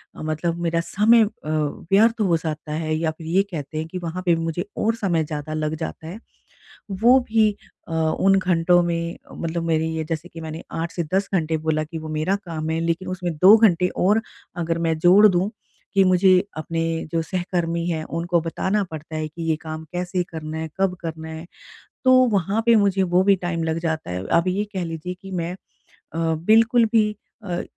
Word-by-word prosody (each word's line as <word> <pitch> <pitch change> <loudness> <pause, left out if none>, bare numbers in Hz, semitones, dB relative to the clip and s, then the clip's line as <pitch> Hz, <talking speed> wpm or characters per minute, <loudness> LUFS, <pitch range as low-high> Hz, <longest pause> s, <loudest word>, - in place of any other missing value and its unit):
अ, - - -10
मतलब 155 +2 -2
मेरा 170 -1 0
समय 220 +6 +4
अ, 215 - +1 0.2
व्यर्थ 195 +9 +1
हो 175 -5 +3
जाता 155 -1 -5
है 155 0 -1
या 160 0 0
फिर 160 -2 -9
ये 190 +4 +3
कहते 155 -1 -5
हैं 160 +1 -3
कि 185 - -6
वहाँ 170 +2 -4
पे 170 -2 +4
मुझे 165 +3 -3
और 225 +1 +1
समय 175 -7 0
ज़्यादा 150 0 -5
लग 155 0 -2
जाता 160 0 -6
है। 185 +6 -7 0.8
वो 245 +3 +7
भी 220 -1 +4 0.4
अ, 165 - -6
उन 160 +4 +2
घंटों 175 -1 +3
में 170 0 -2
मतलब 165 0 -3
मेरी 160 -1 0
ये 160 - -2
जैसे 165 +2 -4
कि 165 - -10
मैंने 160 +1 -7
8 165 +1 -3
से 170 - -2
10 195 +1 0
घंटे 160 -2 0
बोला 155 0 +1
कि 160 +2 -7
वो 155 0 -7
मेरा 155 +5 0
काम 160 -2 -4
है 160 0 0
लेकिन 170 +2 -1
उसमें 180 -2 -3
2 190 +6 +8
घंटे 180 -5 +4
और 210 +5 +3 0.4
अगर 165 -1 -1
मैं 160 - +1
जोड़ 190 +5 +7
दूँ 190 +2 +1 0.4
कि 195 - +6
मुझे 185 0 +4 0.3
अपने 165 +1 -3 0.3
जो 165 -1 +1
सहकर्मी 170 -2 -2
हैं 160 -2 -2
उनको 170 +2 -1
बताना 190 +5 -1
पडता 155 0 -7
है 155 0 -2
कि 160 +2 -10
ये 160 - +3
काम 155 0 -6
कैसे 180 +1 -1
करना 155 -1 -5
है, 160 0 -4
कब 190 -2 +2
करना 160 -1 -6
है, 160 +1 -7 0.6
तो 260 - +5 0.2
वहाँ 200 +3 +1
पे 235 - +7
मुझे 195 -2 +2
वो 180 0 +2
भी 200 0 +5
टाइम 175 -2 -3
लग 160 0 -1
जाता 160 - -3
है। 90 +1 -4
आप 170 - +1
ये 200 +3 0
कह 185 -2 -2
लीजिए 165 +2 -5
कि 195 - -10
मैं 175 -1 -3 0.4
अ, 165 - -11 0.3
बिल्कुल 230 +2 +5
भी 215 -2 +4 0.3
अ, 175 -3 -3
170 Hz, 205 wpm, -22 LUFS, 160-190 Hz, 0.8 s, 2